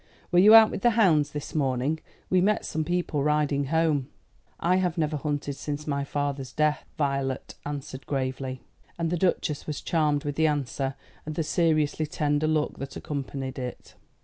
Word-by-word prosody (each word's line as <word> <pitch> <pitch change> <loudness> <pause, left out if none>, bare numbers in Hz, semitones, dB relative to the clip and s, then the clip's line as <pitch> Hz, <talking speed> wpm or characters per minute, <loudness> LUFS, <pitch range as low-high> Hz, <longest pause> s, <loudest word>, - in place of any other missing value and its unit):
Were 175 - +5
you 210 +4 +9
out 225 -1 +9
with - - -4
the 240 - +5
hounds 160 -9 +4
this 150 +2 -6
morning? 140 0 0 0.3
We 185 -1 +3
met 210 +3 +2
some 160 - -2
people 170 -3 -1
riding 150 -1 +1
home." 155 -2 +1 0.5
"I 180 +2 +2
have 180 -2 0
never 155 -1 0
hunted 145 -1 -2
since 145 +2 -5
my 140 -2 -1
father's 140 -2 -3
death," 150 +1 +1
Violet 140 -3 -1
answered 140 -2 -6
gravely; 130 -1 -3 0.4
and 165 -1 -1
the - - +2
Duchess 165 -4 0
was 150 -2 -3
charmed 150 -3 +1
with 145 -1 -4
the 160 0 +4
answer 135 -2 -1 0.3
and 155 0 -6
the 165 - 0
seriously 155 -1 +1
tender 150 -1 0
look 155 -1 0
that 135 0 -6
accompanied 135 -2 -4
it. 125 -1 -7
150 Hz, 175 wpm, -27 LUFS, 140-160 Hz, 0.5 s, you